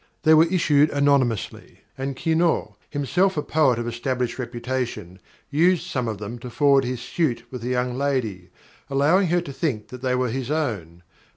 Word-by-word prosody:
They 160 -1 +6
were 160 +2 +6
issued 155 -5 +3
anonymously, 140 -6 0
and 135 0 -4
Quinault, 165 +4 0
himself 175 +6 +1
a 150 - 0
poet 150 -6 +2
of 120 0 -3
established 125 +1 -2
reputation, 120 -6 -4 0.3
used 170 +4 +3
some 125 -3 -2
of 110 -2 -3
them 105 +4 -7
to 125 - -8
forward 140 +1 +3
his 125 -1 -3
suit 140 -2 -1
with 125 -3 -7
a - - -3
young 125 0 -1
lady, 125 -10 -2 0.4
allowing 150 +8 +3
her 175 +1 +2
to 140 -5 -8
think 130 -9 -2
that 125 -1 -9
they 130 -1 0
were 125 -1 0
his 130 +1 -4
own. 105 - -3
130 Hz, 175 wpm, -23 LUFS, 120-150 Hz, 0.4 s, They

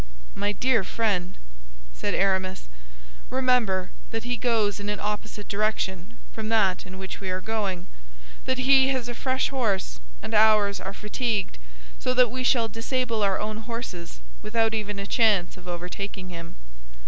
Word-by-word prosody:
"My 205 +1 0
dear 235 -1 +2
friend," 190 -4 -1 0.6
said - - -2
Aramis, 190 - +1 0.6
"remember 250 -8 +2 0.2
that 225 0 -3
he 245 0 -1
goes 225 -5 +1
in 200 0 -4
an 210 - -2
opposite 210 0 -4
direction 200 -2 -1 0.2
from 220 -1 -4
that 195 -5 +2
in 185 +1 -8
which 190 0 -6
we 190 - -3
are 185 0 0
going, 195 -4 -2 0.6
that 260 - +1
he 265 0 +6
has 260 -3 0
a 240 - -3
fresh 260 +2 0
horse, 205 - -1 0.2
and - - -5
ours 215 -2 +5
are 195 +1 -5
fatigued, 210 - -1 0.4
so 255 - 0
that 250 -3 +5
we 255 0 -2
shall 240 -3 +4
disable 230 0 -1
our 195 -2 +2
own 215 0 -2
horses 220 - -6 0.2
without 225 0 +1
even 210 -2 -2
a 200 - -3
chance 205 -4 +3
of 180 -1 -13
overtaking 180 +2 -5
him. 170 -1 -8
210 Hz, 160 wpm, -26 LUFS, 190-230 Hz, 0.6 s, he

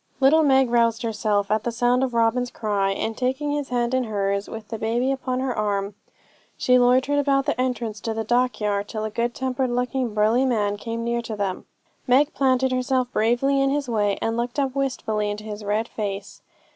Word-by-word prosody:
Little 280 +4 +5
Meg 265 -4 +3
roused 230 -1 +2
herself 210 -3 0
at 215 0 +1
the 240 - -1
sound 245 +2 +2
of 250 -3 -2
Robin's 235 +2 +2
cry, 205 -4 -1
and 220 +3 -2
taking 265 +4 -1
his 290 -1 -2
hand 240 0 0
in 260 -1 +1
hers, 200 -2 -1
with 220 -1 -8
the 225 - -5
baby 235 +4 0
upon 260 -1 -2
her 260 -2 -1
arm, 205 -1 -1 0.6
she 250 0 +4
loitered 255 +4 +3
about 275 -1 +2
the 290 -3 0
entrance 235 -5 -2
to 225 - -2
the 225 - -2
dockyard, 215 -4 0
till 215 0 -4
a 215 - -4
good 235 +2 -1
tempered 260 0 -1
looking 250 -1 -1
burly 220 +4 +3
man 210 -6 +1
came 230 +2 -4
near 235 0 -1
to 225 -2 -6
them. 200 -3 -3 0.4
Meg 270 +4 +4
planted 260 -1 +2
herself 255 0 0
bravely 245 +5 +2
in 275 - +2
his 285 0 -1
way, 205 -4 0
and 225 0 0
looked 240 +3 -3
up 270 -2 0
wistfully 220 -6 -1
into 205 +1 -5
his 210 0 -7
red 210 +3 -1
face. 200 -2 -5
235 Hz, 200 wpm, -23 LUFS, 215-260 Hz, 0.6 s, Little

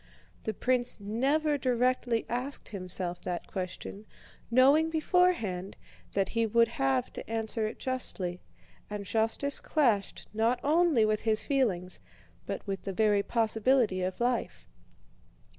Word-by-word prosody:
The 220 - -1
prince 250 0 +1
never 280 +9 +1
directly 250 -2 +1
asked 250 +4 -3
himself 180 -2 -3
that 175 -1 -4
question, 195 +2 -6 0.4
knowing 275 +7 +5
beforehand 310 - +1 0.4
that 195 -1 +1
he 230 -1 +1
would 230 +2 +4
have 135 - 0
to - - -8
answer 225 -1 -1
it - - -7
justly, 190 -9 -3 0.5
and 205 -1 -5
justice 225 +7 0
clashed 235 -10 0
not 230 +3 +1
only 305 -6 +4
with 215 0 +1
his 220 -1 +1
feelings 195 -11 0 0.5
but - - -4
with 195 -2 -3
the 195 - -5
very 210 0 +3
possibility 225 -1 +2
of 185 0 -3
life. 240 0 -1
225 Hz, 125 wpm, -30 LUFS, 200-255 Hz, 0.5 s, knowing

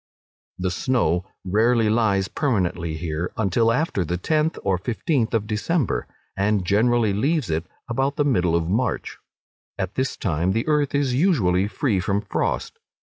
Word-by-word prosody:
The 90 0 -1
snow 90 -4 0 0.2
rarely 110 +4 +3
lies 105 -4 +2
permanently 90 - -1
here 80 +1 -3
until 110 +2 +2
after 135 - 0
the 85 +2 -2
tenth 155 - 0
or 95 -2 +1
fifteenth 120 - -1
of 110 -2 0
December, 115 - -1 0.3
and 100 -1 +1
generally 110 +2 +2
leaves 135 - 0
it 80 +2 -2 0.2
about 135 +4 0
the 145 - +1
middle 90 -11 +2
of 85 -1 0
March: 110 +7 -1 0.6
at 95 0 -3
this 130 0 -2
time 85 +2 0
the 115 +2 0
earth 150 -2 +1
is 140 -3 +1
usually 110 - +2
free 105 0 0
from 100 +2 0
frost. - - -2
105 Hz, 150 wpm, -23 LUFS, 90-130 Hz, 0.6 s, rarely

